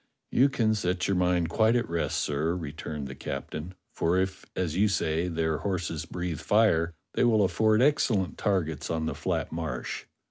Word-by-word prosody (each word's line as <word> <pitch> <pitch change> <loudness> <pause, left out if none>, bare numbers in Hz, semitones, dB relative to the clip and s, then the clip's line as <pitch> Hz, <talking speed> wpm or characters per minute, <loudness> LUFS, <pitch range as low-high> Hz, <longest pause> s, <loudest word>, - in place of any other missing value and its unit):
"You 135 +3 +5
can 110 -5 +2
set 90 -3 0
your 100 - +1
mind 90 -2 +2
quite 110 +6 +3
at 120 - +1
rest, 85 0 -1
sir," 75 +4 0
returned 75 -3 -5
the 65 - -7
captain, 75 +7 -6 0.2
"for 85 +2 +1
if 95 0 -2
as 85 -4 -1
you 100 +3 +4
say 85 -3 0
their 80 -2 0
horses 85 -5 -2
breathe 90 -3 -3
fire, 85 -5 +3 0.2
they - - +2
will 110 -4 +4
afford 110 +5 +3
excellent 120 -10 +2
targets 80 -8 0
on 80 -1 -1
the 80 - -1
flat - - -2
Marsh. 80 -7 -4
90 Hz, 175 wpm, -28 LUFS, 80-105 Hz, 0.2 s, You